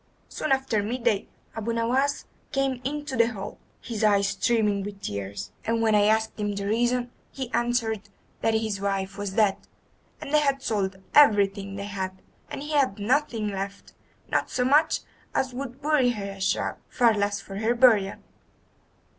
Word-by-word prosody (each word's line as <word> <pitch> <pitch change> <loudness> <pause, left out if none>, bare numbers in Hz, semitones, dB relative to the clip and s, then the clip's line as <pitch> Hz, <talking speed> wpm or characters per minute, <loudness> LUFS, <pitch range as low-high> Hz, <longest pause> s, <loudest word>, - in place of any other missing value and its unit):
"Soon 310 - -3
after 265 -5 +2
midday 230 -1 0 0.3
Abu 225 +1 -2
Nowas 255 +5 +1 0.3
came 270 -2 0
into 290 0 -3
the 230 -1 +4
hall, 195 -2 -7 0.2
his 225 -3 -4
eyes 200 -2 +4
streaming 210 0 +1
with 200 0 -7
tears, 100 - -5
and 230 0 0
when 225 -1 +3
I 205 -1 +5
asked 220 +1 +1
him 205 -1 -1
the 200 0 -3
reason 240 +3 +1 0.2
he 260 -3 -6
answered 225 -4 0 0.3
that 225 - +2
his 220 -3 -1
wife 195 0 -1
was 200 -2 -3
dead, 205 -2 +3 0.6
and 285 - -7
they 300 - +6
had 275 -2 +1
sold 195 -3 -1 0.2
everything 200 -7 +4
they 200 0 -5
had, 190 -2 -4 0.3
and 275 - -5
he 300 - -6
had 275 -9 +2
nothing 230 -1 0
left, 200 0 -6 0.3
not - - 0
so 250 - 0
much 300 +4 +4 0.3
as 260 -1 0
would 265 +1 -6
buy 295 -4 +3
her 200 -4 -3
a 195 0 -10
shroud, 190 - 0
far 235 -3 +4
less 205 -1 0
for 195 0 -8
her 225 +3 +1
burial." 220 -6 +4
220 Hz, 170 wpm, -26 LUFS, 200-250 Hz, 0.6 s, they